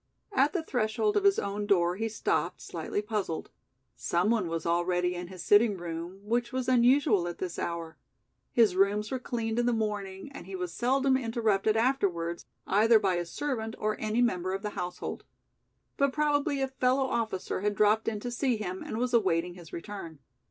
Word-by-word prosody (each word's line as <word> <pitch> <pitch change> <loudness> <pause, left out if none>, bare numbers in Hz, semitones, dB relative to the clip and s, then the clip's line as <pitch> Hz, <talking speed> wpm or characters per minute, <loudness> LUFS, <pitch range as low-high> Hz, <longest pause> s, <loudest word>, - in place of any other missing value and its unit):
At 290 -7 +3
the 355 -4 -1
threshold 245 - 0
of 410 -1 +2
his 395 -1 +5
own 205 +1 -2
door 175 -3 +3
he 225 +3 -2
stopped, 220 - -1
slightly 205 - -4
puzzled. 205 -6 -3 0.4
Some 170 - +1
one 215 -6 +1
was 165 -1 -3
already 175 +1 +1
in 175 0 -5
his 185 -1 -8
sitting 205 -1 +5
room, 170 +2 -6
which 235 +3 0
was 260 -1 -2
unusual 245 - +4
at 175 - -5
this 180 -2 -4
hour. 170 -1 -4 0.5
His 220 -6 +4
rooms 205 +3 +2
were 260 - -1
cleaned 230 -2 -2
in 240 - +2
the 245 - +3
morning 210 0 -3
and 275 - -10
he 195 - -6
was 180 -2 -4
seldom 265 +4 +2
interrupted 225 -4 +1
afterwards 190 -9 0 0.2
either 220 +3 +5
by 195 -3 +1
a 175 - -2
servant 225 -1 -3
or 215 0 -1
any 220 +3 +1
member 185 -5 0
of 195 - -6
the 210 - -2
household. 180 -2 -5 0.7
But 280 -1 +2
probably 290 -1 +1
a - - +1
fellow 265 0 +1
officer 220 -7 -2
had 205 0 0
dropped 215 +2 +3
in 215 -2 -1
to 245 - -4
see 245 -1 0
him 190 -3 -4
and - - -5
was 245 +1 -1
awaiting 180 -6 +2
his 175 -3 -13
return. 170 -3 -7
210 Hz, 185 wpm, -29 LUFS, 180-245 Hz, 0.7 s, his